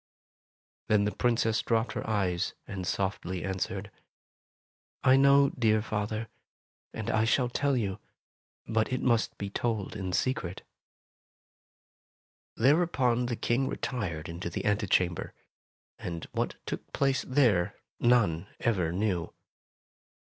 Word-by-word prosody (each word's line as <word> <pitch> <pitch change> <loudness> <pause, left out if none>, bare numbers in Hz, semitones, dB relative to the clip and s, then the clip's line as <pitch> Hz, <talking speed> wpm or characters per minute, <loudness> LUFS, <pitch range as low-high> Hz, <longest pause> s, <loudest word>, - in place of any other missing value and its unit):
Then 105 -1 +3
the 105 - +1
Princess 115 -2 +2
dropped 115 -1 +1
her - - -4
eyes 95 -5 0
and 95 -2 -5
softly 95 -2 -2
answered, 95 -1 -3 0.6
" - - -54
I 130 - +6
know, 140 0 +6
dear 110 -3 +2
father, 110 +1 -2 0.6
and 110 - -3
I 110 - +3
shall 120 +2 +2
tell 140 +2 +1
you, 100 -5 -2 0.7
but 110 +1 +1
it 130 - -1
must 115 -3 +2
be 100 -1 -5
told 110 -3 -2
in 95 -3 -3
secret." 95 -4 -1 1.9
Thereupon 130 -3 +3
the 120 - -1
King 125 +4 0
retired 95 - -3
into 85 +1 -5
the - - -4
ante 105 0 +1
chamber, 90 -2 +1 0.6
and 85 -2 -5
what - - -1
took - - -5
place 135 -1 +2
there, 110 -9 +3 0.2
none 105 -8 +3
ever 95 -8 +1
knew. 90 -3 -1
110 Hz, 125 wpm, -29 LUFS, 95-125 Hz, 1.9 s, I